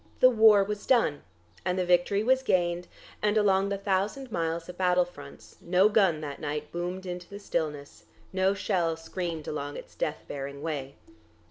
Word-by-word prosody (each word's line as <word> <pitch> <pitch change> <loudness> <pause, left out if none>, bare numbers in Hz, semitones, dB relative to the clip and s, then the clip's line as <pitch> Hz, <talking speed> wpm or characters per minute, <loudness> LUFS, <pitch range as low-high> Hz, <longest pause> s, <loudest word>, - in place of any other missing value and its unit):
The 255 - +7
war 220 -3 +6
was 205 +1 -5
done, 230 - +3 0.4
and 180 - -1
the 185 - +1
victory 180 +3 +3
was 260 +3 +3
gained, 175 -6 0 0.3
and 210 0 +2
along 195 -2 +3
the 200 - -1
thousand 200 +6 -1
miles 165 -1 -2
of 180 - -8
battle 180 -1 +3
fronts 145 -5 -13
no 185 +4 +4
gun 190 -8 +3
that 145 -2 -6
night 150 0 -4
boomed 180 +2 -4
into 180 -1 -6
the 200 - -8
stillness, 150 - -4 0.3
no 190 +1 +2
shell 175 -5 0
screamed 165 -1 -5
along 145 -1 -4
its - - -11
death 155 - -3
bearing 140 0 -6
way. 140 -4 -4
180 Hz, 170 wpm, -28 LUFS, 160-200 Hz, 0.4 s, The